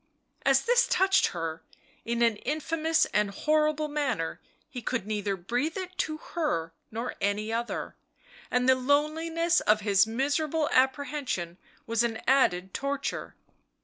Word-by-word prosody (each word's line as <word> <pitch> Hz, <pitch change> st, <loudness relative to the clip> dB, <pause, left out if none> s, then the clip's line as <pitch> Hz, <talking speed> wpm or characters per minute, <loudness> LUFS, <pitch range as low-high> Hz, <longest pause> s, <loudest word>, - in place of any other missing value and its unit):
As -, -, +5 dB
this 485 Hz, +1 st, +4 dB
touched 385 Hz, +1 st, +3 dB
her, 165 Hz, -2 st, -4 dB, 0.4 s
in 235 Hz, 0 st, 0 dB
an 230 Hz, -3 st, +3 dB
infamous 315 Hz, +4 st, 0 dB
and 210 Hz, -1 st, +2 dB
horrible 305 Hz, +6 st, +1 dB
manner, 270 Hz, -, -2 dB, 0.3 s
he 250 Hz, -, -7 dB
could 235 Hz, -3 st, -2 dB
neither 205 Hz, -2 st, -1 dB
breathe 245 Hz, -, -2 dB
it 370 Hz, -1 st, -6 dB
to 310 Hz, 0 st, -1 dB
her 170 Hz, -, -2 dB, 0.2 s
nor 230 Hz, +3 st, -4 dB
any 210 Hz, +2 st, 0 dB
other, 235 Hz, +1 st, -3 dB, 0.5 s
and 250 Hz, 0 st, +1 dB
the 260 Hz, -, +7 dB
loneliness 320 Hz, +6 st, +1 dB
of 215 Hz, 0 st, +2 dB
his 200 Hz, 0 st, +4 dB
miserable 290 Hz, +6 st, 0 dB
apprehension 260 Hz, -, 0 dB, 0.3 s
was 230 Hz, 0 st, +1 dB
an 225 Hz, -2 st, -1 dB
added 190 Hz, -9 st, +3 dB
torture. 275 Hz, 0 st, -3 dB
255 Hz, 135 wpm, -28 LUFS, 215-305 Hz, 0.5 s, the